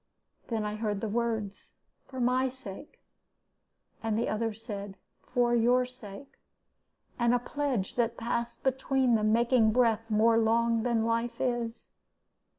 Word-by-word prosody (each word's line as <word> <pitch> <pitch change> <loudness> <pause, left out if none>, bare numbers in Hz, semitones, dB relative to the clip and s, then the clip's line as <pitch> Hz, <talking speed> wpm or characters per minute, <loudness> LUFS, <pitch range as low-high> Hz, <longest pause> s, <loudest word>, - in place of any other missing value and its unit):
Then 220 -3 -2
I 210 0 -3
heard 210 -2 -2
the 220 - -3
words, 220 -2 -3 0.3
'for 260 - -8
my 255 +2 +2
sake,' 255 -1 -11 1.0
and 225 -1 -1
the 230 - 0
other 225 +1 -1
said, 205 -3 -7 0.2
'for 245 -1 +1
your 245 +2 +3
sake,' 250 +1 -12 0.8
a 235 +1 +3
pledge 250 -5 -2
that 235 -1 +1
passed 235 +1 -3
between 265 -1 +1
them, 215 -1 +3
making 235 -1 +4
breath 225 -2 +2
more 225 +1 +4
long 230 0 +2
than 230 -1 +1
life 230 +1 -1
is. 240 -2 -2
230 Hz, 135 wpm, -29 LUFS, 220-245 Hz, 1.0 s, making